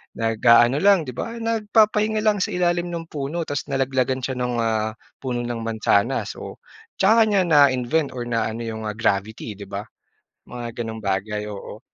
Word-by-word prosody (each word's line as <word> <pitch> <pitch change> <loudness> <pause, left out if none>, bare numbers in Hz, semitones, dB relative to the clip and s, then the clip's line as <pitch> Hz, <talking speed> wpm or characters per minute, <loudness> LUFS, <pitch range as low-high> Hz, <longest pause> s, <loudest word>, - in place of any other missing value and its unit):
nag-aano 115 +4 +4
lang 195 -2 +5
'di 130 - -6
ba? 230 - -5
Nagpapahinga 215 -1 +2
lang 210 -2 +2
sa - - +1
ilalim 175 -1 0
ng 170 -1 -6
puno 150 +4 -3
tas 145 -1 -4
nalaglagan 130 -1 0
siya 130 -1 -3
ng, 125 0 -1
ah, 110 -1 0 0.2
puno 120 -2 -3
ng 120 -1 -3
mansanas, 110 -2 0
oh. - - -8 0.4
'Tsaka 220 +3 +4
niya 200 -3 +3
na-invent 140 -2 +3
or 120 - -3
na 115 -1 -1
ano 115 +2 -5
yung, 110 -1 -5
ah, 105 - -4
gravity 110 0 -1
'di 100 - -8
ba? 100 +2 -5 0.6
Mga 120 -1 -7
ganong 110 0 -6
bagay, 105 +2 -2
oo. 105 +1 -8
125 Hz, 170 wpm, -23 LUFS, 110-175 Hz, 0.6 s, lang